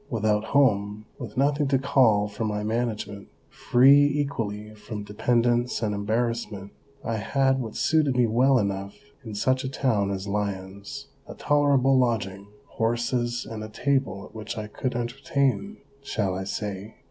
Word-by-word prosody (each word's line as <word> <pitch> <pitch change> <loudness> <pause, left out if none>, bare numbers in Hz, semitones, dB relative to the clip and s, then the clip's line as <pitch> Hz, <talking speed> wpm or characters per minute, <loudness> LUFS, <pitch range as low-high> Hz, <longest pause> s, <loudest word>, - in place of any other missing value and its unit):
Without 110 -2 0
home, 105 -6 +2
with 115 -4 -8
nothing 145 +1 +2
to 135 0 +3
call 115 -6 +3
for 105 +2 -5
my 105 -1 -2
management, 110 -2 -3 0.2
free 135 +4 +5
equally 115 -8 -2
from 105 0 -7
dependence 120 +3 +1
and 105 -1 0
embarrassment, 110 -1 -2 0.3
I 115 -1 -1
had 135 +4 +1
what 115 -4 -5
suited 155 -4 +2
me 125 - +5
well 125 +4 +3
enough 100 -2 -2 0.3
in 110 -3 -7
such 130 +5 +1
a 130 - -2
town 115 -7 0
as 95 0 -4
Lyons, 100 +5 -4 0.2
a - - -9
tolerable 140 -2 +3
lodging, 100 -5 -1 0.2
horses, 120 +1 -1
and 110 -1 -6
a 110 - -7
table 130 -4 -1
at - - -16
which 110 0 -6
I 110 - -3
could 125 +4 -4
entertain 135 - -1
— 140 0 -32
shall 105 -8 -1
I 95 +1 -4
say 100 +1 -5
115 Hz, 155 wpm, -25 LUFS, 105-130 Hz, 0.3 s, free